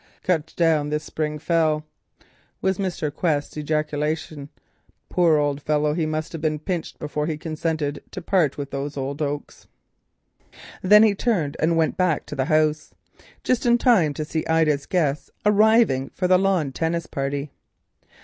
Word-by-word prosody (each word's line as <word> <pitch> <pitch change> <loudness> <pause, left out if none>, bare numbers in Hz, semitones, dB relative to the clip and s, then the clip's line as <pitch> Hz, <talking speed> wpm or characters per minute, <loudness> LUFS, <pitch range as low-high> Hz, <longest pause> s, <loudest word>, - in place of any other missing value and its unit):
"Cut 165 -4 -1
down 160 -3 +2
this 150 +1 -2
spring 150 -1 -3
fell," 155 -1 +1 0.7
was 190 0 0
Mr. 175 -6 -2
Quest's 150 -3 -1
ejaculation. 150 -1 -2 0.6
"Poor 170 -4 +3
old 145 -1 -1
gentleman, 150 0 +1
he 160 -2 0
must 155 0 -3
have 165 - -6
been 155 -1 0
pinched 170 +2 -4
before 150 0 -3
he 155 -2 -2
consented 155 -2 -3
to - - -7
part 170 -5 +1
with 140 -1 -5
those 140 +1 -4
oaks." 140 +2 -4 1.1
Then 210 +3 +7
he 215 -2 +4
turned 195 -9 -1
and 165 +1 +2
went 160 -1 +1
back 180 -5 +1
to - - -7
the 130 -1 0
house, 155 +1 +1 0.5
just 250 -1 +1
in 240 0 +5
time 195 - +3
to 155 - -3
see 160 +1 -2
Ida's 155 -3 +2
guests 150 -6 0 0.2
arriving 210 - +4
for 180 - 0
the 185 0 +5
lawn 185 -7 +1
tennis 165 +3 -2
party. 140 +1 -3
155 Hz, 155 wpm, -23 LUFS, 150-175 Hz, 1.1 s, Then